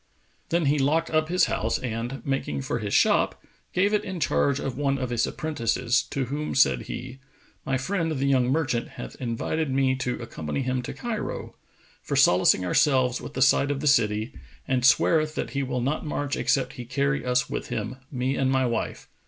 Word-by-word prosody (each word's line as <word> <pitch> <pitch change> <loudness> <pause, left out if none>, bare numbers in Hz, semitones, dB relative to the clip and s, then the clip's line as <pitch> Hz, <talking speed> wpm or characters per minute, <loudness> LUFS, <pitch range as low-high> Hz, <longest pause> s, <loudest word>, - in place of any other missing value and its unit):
" - - -39
Then 170 -1 +1
he 145 +1 +2
locked 155 +5 +1
up 155 0 +1
his 180 +1 +4
house 110 +1 -1
and, 120 +2 -4
making 105 - -2
for - - -2
his - - -4
shop, - - +3 0.3
gave 200 +3 +2
it 210 - +2
in 185 -2 -5
charge 140 -3 +1
of 135 - -3
one 140 0 0
of 125 -2 -3
his 120 -1 +1
apprentices 125 -4 0
to 135 -2 -1
whom 145 +4 -3
said 135 - +4
he, 125 +2 -6 0.5
"My 135 0 +1
friend 165 +4 -1
the 140 -3 -1
young 130 -3 +3
merchant 135 -6 0
hath - - -7
invited 130 +6 -2
me 130 0 +2
to 125 -1 -2
accompany 115 - -4
him 130 0 -1
to 125 - -6
Cairo, 235 -4 -4 0.5
for - - -3
solacing 90 +1 +4
ourselves 130 +5 +2
with - - -9
the 130 - +3
sight 140 +1 +4
of 145 -1 -1
the - - -5
city, 110 -5 +2 0.3
and 125 -2 +1
sweareth 155 +4 +4
that - - -3
he 140 - -1
will 125 -2 -2
not 140 +5 -1
march 145 -2 -2
except 135 -2 0
he 125 -4 -8
carry 140 +2 0
us 125 0 +1
with - - -4
him, 115 +4 -3
me 130 0 -1
and 135 -1 +1
my 130 -1 +2
wife. 115 -2 -3
135 Hz, 200 wpm, -26 LUFS, 125-145 Hz, 0.5 s, his